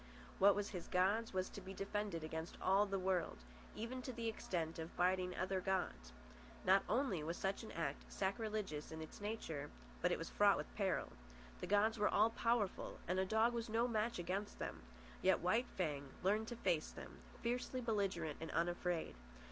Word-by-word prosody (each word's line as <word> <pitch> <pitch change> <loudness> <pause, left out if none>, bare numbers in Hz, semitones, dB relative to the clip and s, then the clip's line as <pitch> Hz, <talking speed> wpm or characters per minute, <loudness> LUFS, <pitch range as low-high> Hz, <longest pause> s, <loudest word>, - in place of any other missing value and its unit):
What 200 +1 +7
was 205 0 -1
his 180 -3 -5
god's 200 +5 +2
was 185 0 0
to 200 - -8
be 190 +1 -7
defended 200 -4 -2
against 160 +1 -4
all 195 +2 +4
the 195 0 0
world—even 185 - -3
to 255 - -4
the 230 -1 -3
extent 170 -7 -2
of 160 +1 -6
biting 180 0 +2
other 185 0 0
gods. 180 - -1 0.5
Not 190 +1 +6
only 235 - +2
was 165 +3 -3
such 195 0 -1
an 225 - -8
act 145 -4 -3
sacrilegious 200 -6 -2
in 160 - -5
its 160 +5 -8
nature, 165 -9 -3 0.3
but - - +3
it - - +2
was - - -4
fraught 60 - +5
with - - -5
peril. - - 0 0.5
The - - -4
gods 215 +2 +3
were 210 - +4
all 225 - +4
powerful, 230 -4 0
and 180 +2 +1
a 190 - +3
dog 220 +4 +3
was 230 -1 -2
no 230 +2 +2
match 230 0 0
against 190 +4 -2
them; - - -4 0.4
yet 190 -1 +5
White 220 +8 +2
Fang 145 -6 -1
learned 210 +4 +2
to 240 - -4
face 165 -8 +1
them, - - -10 0.2
fiercely 245 +2 -1
belligerent 195 - 0
and 160 - -4
unafraid. 175 0 0
190 Hz, 180 wpm, -40 LUFS, 170-220 Hz, 0.5 s, What